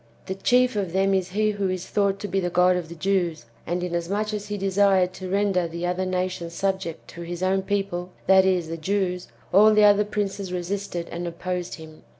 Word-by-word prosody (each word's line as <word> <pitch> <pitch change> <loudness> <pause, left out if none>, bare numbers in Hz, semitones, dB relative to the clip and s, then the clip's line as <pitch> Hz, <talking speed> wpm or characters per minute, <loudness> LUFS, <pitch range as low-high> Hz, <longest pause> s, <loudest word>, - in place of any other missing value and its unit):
The 190 - -3
chief 250 +4 +2
of 190 -5 -2
them 195 +1 +2
is 185 -2 0
he 215 +3 +1
who 200 -2 -1
is 185 -1 -3
thought 200 -1 +1
to 205 - -3
be 195 - 0
the 175 -2 -1
God 180 +1 +4
of 175 -3 -4
the 170 - -8
Jews; 175 -5 -1 0.2
and 175 +1 -1
inasmuch 180 +5 -2
as 210 -1 -4
he 205 0 -3
desired 195 -1 +2
to 185 0 -7
render 195 -2 +1
the 170 +1 -5
other 180 +1 -1
nations 185 -2 -2
sub 195 +1 0
ject 165 -4 -7
to 170 - -9
his 175 +1 -5
own 190 +1 +2
people, 195 -3 -2 0.2
that 190 0 +6
is, 185 -3 +1
the 165 +1 -5
Jews, 180 +1 -1 0.3
all 215 +3 +7
the 210 - +5
other 205 0 +6
princes 200 -2 -3
resisted 180 -1 -3
and 175 +1 -4
opposed 180 +1 -4
him. 160 -1 -13
185 Hz, 215 wpm, -24 LUFS, 175-200 Hz, 0.3 s, all